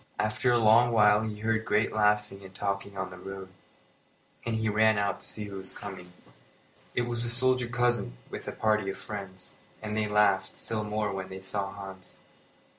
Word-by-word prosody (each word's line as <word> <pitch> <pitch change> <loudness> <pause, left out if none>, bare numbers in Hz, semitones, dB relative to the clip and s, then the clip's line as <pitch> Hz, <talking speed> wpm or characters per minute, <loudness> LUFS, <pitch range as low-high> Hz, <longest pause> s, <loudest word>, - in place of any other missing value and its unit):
After 110 +4 +1
a 120 - +5
long 115 +2 +5
while 105 -2 +5
he 105 -1 -4
heard 110 0 +1
great 110 0 +1
laughing 105 -2 +1
and 95 0 -12
talking 100 0 -3
on 95 0 -3
the 90 - -10
road, 95 0 -8 0.9
and 115 -1 -1
he 110 0 0
ran 110 0 +4
out 100 0 0
to - - -8
see 105 - -3
who 100 -1 -7
was 95 0 -3
coming. 95 -3 -8 0.8
It 125 - +2
was 120 -1 -1
the 120 - +1
soldier 125 0 +4
cousin 120 - 0
with - - -8
a - - -2
party 105 -2 +1
of 95 - -4
friends, 95 -3 -8 0.2
and 105 -1 -4
they 110 -1 +1
laughed 100 -2 +2
still 110 -1 -2
more 105 -1 -1
when 95 -1 -5
they 95 0 -7
saw 100 +1 -2
Hans. 95 -2 -10
105 Hz, 190 wpm, -29 LUFS, 95-110 Hz, 0.9 s, a